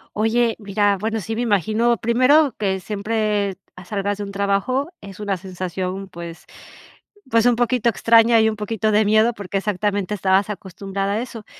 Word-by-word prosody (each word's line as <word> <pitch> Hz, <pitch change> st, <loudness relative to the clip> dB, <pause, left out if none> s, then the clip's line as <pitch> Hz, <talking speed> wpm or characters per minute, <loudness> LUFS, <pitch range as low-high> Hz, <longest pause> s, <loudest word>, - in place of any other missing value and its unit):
Oye, 225 Hz, +2 st, +1 dB
mira, 205 Hz, -1 st, +1 dB
bueno, 220 Hz, +1 st, -2 dB
sí 220 Hz, +3 st, -4 dB
me 240 Hz, -, -2 dB
imagino 225 Hz, +2 st, +1 dB
primero 255 Hz, +4 st, +3 dB
que 190 Hz, -2 st, 0 dB
siempre 210 Hz, 0 st, -1 dB, 0.2 s
a 185 Hz, -, -11 dB
salgas 200 Hz, +1 st, -3 dB
de -, -, -3 dB
un 200 Hz, -, -6 dB
trabajo, 200 Hz, -, 0 dB
es 195 Hz, 0 st, -11 dB
una 200 Hz, -2 st, -2 dB
sensación, 185 Hz, +1 st, -5 dB
pues 170 Hz, -2 st, -9 dB, 0.9 s
pues 230 Hz, 0 st, +3 dB
un 245 Hz, -, +4 dB
poquito 245 Hz, -1 st, +1 dB
extraña 230 Hz, +1 st, +4 dB
y 220 Hz, -, +3 dB
un 215 Hz, -, -4 dB
poquito 215 Hz, 0 st, -1 dB
de 215 Hz, +1 st, +3 dB
miedo, 220 Hz, +3 st, +3 dB
porque 200 Hz, -2 st, -4 dB
exactamente 205 Hz, 0 st, -1 dB
estabas 190 Hz, +1 st, +2 dB
acostumbrada 195 Hz, 0 st, -4 dB
a 215 Hz, -, -1 dB
eso. 230 Hz, -3 st, -8 dB
210 Hz, 170 wpm, -21 LUFS, 195-225 Hz, 0.9 s, un